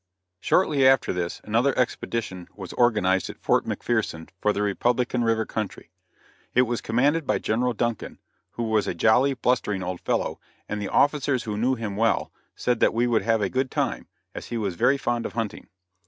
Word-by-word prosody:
Shortly 140 - +3
after 135 -5 +4
this, 90 -1 -3
another 120 +6 +1
expedition 115 -7 -2
was 95 -3 -8
organized 105 -6 +2
at - - -8
Fort - - +1
McPherson 110 -9 -2
for 105 - +3
the 105 - -1
Republican 120 +4 0
river 115 -1 +1
country. 105 -2 -5 0.6
It 125 - +6
was 120 -1 -2
commanded 140 +6 +1
by - - +2
General 120 +3 0
Duncan, 115 -1 -3 0.4
who 120 - -3
was 110 -2 +1
a - - -2
jolly, 125 +9 +3
blustering 115 -7 0
old 90 0 -4
fellow, - - -1 0.3
and 105 - -3
the 100 - -3
officers 140 -3 +2
who 105 -2 -4
knew 125 +5 +1
him 110 -4 -4
well, 115 +2 +1 0.2
said 120 -2 0
that - - +3
we 120 +1 +2
would 120 -2 +2
have 115 -2 +1
a - - +2
good 130 +5 -1
time, - - -2 0.3
as - - -7
he 120 - -3
was 100 -4 -2
very 135 +11 +3
fond 120 -3 -1
of - - -12
hunting. 115 -2 -4
115 Hz, 185 wpm, -25 LUFS, 105-125 Hz, 0.6 s, It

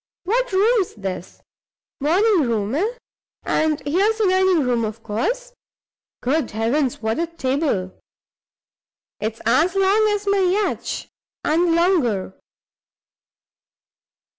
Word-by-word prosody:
What 485 +6 0
room's 405 +1 +2
this? 190 -4 -6 0.6
Morning 340 - +2
room, 215 -1 -1
eh? 415 - 0 0.5
And 310 -1 +1
here's 385 +10 +1
the 440 - +1
dining 370 -3 +3
room, 245 -2 0
of 220 +1 -5
course. - - -2 0.7
Good 270 +1 0
heavens, 235 +3 -1
what 220 +6 -1
a 335 - 0
table! 265 - -1 1.3
it's 220 +2 -4
as 315 - +3
long 395 +3 +3
as 415 -1 -1
my 400 0 +2
yacht, 380 +3 0 0.4
and 330 +2 +2
longer. 280 - +1
325 Hz, 110 wpm, -21 LUFS, 235-390 Hz, 1.3 s, dining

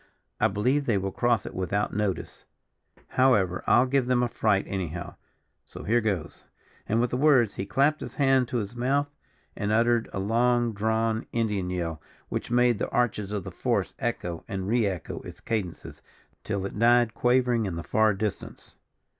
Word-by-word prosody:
I - - +4
believe 125 +9 0
they 110 -4 +2
will 95 0 -2
cross 120 0 +1
it - - -7
without 100 +3 -1
notice. 105 -2 -3 0.6
However, 105 -9 +2
I'll 120 - +5
give 130 -1 +1
them 125 -1 +2
a - - +2
fright 110 -4 +1
anyhow 90 -3 -4 0.5
so - - -10
here 120 +3 +2
goes," 100 -7 -3 0.5
and 110 - +2
with 120 +1 +1
the 125 - 0
words, 130 -6 +4
he 95 - -5
clapped 140 +7 +2
his - - -7
hand 135 -3 +3
to 120 - -2
his 110 +1 -4
mouth, 140 +4 0 0.4
and 105 -1 -2
uttered 115 +1 +2
a - - -5
long 120 +3 +2
drawn 110 +2 0
Indian 105 -5 -1
yell, 85 -3 -3 0.3
which - - -3
made 120 -2 +3
the - - -2
arches 105 -4 0
of 105 -3 -3
the - - -7
forest - - -1
echo 85 -2 -3
and 95 -1 -4
re 115 0 +2
echo 90 -4 -4
its - - -11
cadences, 100 -7 -4 0.4
till 100 -1 -2
it 100 - -6
died 120 0 +4
quavering 120 -3 +2
in 90 - -4
the 85 - -5
far 110 +6 +2
distance. 105 0 -5
110 Hz, 180 wpm, -27 LUFS, 100-120 Hz, 0.6 s, I'll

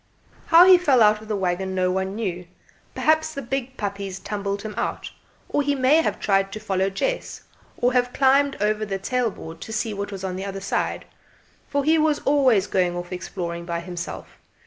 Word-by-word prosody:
How 335 +2 +8
he 370 -1 +8
fell 270 -9 +4
out 210 0 +4
of 220 - -12
the 215 - -1
waggon 190 0 -2
no 185 -1 +1
one 190 +1 -2
knew; 180 -5 -4 0.5
perhaps 315 0 +1
the 280 - -3
big 265 +1 -4
puppies 200 -2 -4
tumbled 200 0 -4
him 215 -1 -5
out, - - -3 0.4
or 290 - 0
he 285 0 0
may 275 +4 +4
have - - -2
tried 195 -1 +1
to 215 - -5
follow 195 -2 0
Jess, - - -3 0.3
or 245 +1 +1
have 245 -1 +2
climbed 275 +1 +3
over 210 +1 0
the 195 -2 -2
tail 245 +4 0
board 165 -4 -10
to - - -7
see 220 0 -2
what 200 0 -5
was 195 -1 -7
the 190 0 -3
other 195 0 -5
side, 195 0 -2 0.6
for 285 0 0
he 315 +3 +3
was 305 -1 +2
always 260 -9 +4
going 180 -3 0
off 175 +1 -6
exploring 170 -1 -5
by 170 0 -3
himself. 175 0 -7
210 Hz, 195 wpm, -23 LUFS, 190-265 Hz, 0.6 s, How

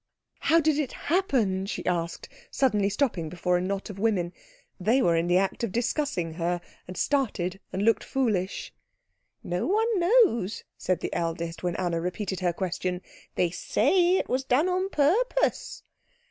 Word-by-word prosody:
"How 330 +1 +4
did 310 -2 +2
it 285 -5 -2 0.2
happen?" 220 - +1
she - - -4
asked, 170 -2 -2 0.2
suddenly 210 -7 +2
stopping 200 - -1
before 180 +1 0
a - - -1
knot 195 +1 -3
of 200 - -10
women. 190 -5 0 0.5
They 225 +8 +3
were 170 -10 +3
in 165 +1 +1
the 175 +1 +4
act 195 +4 0
of 230 - -1
discussing 235 - -1
her, 175 +1 -1 0.3
and 180 - -8
started 200 -10 0
and 195 - -2
looked 225 -1 +3
foolish. 210 -8 -1 0.7
"No 175 +1 -2
one 435 +2 +2
knows," 345 - +3
said 185 -2 -1
the - - -3
eldest, 165 0 -3
when 175 -1 -1
Anna 170 -2 -1
repeated 185 +2 -3
her 180 -2 +1
question. 180 0 -3 0.3
"They 175 -2 +1
say 360 - +2
it - - -1
was 260 +1 0
done 265 +6 +2
on 370 +1 0
purpose." 400 - +1
195 Hz, 160 wpm, -27 LUFS, 180-280 Hz, 0.7 s, How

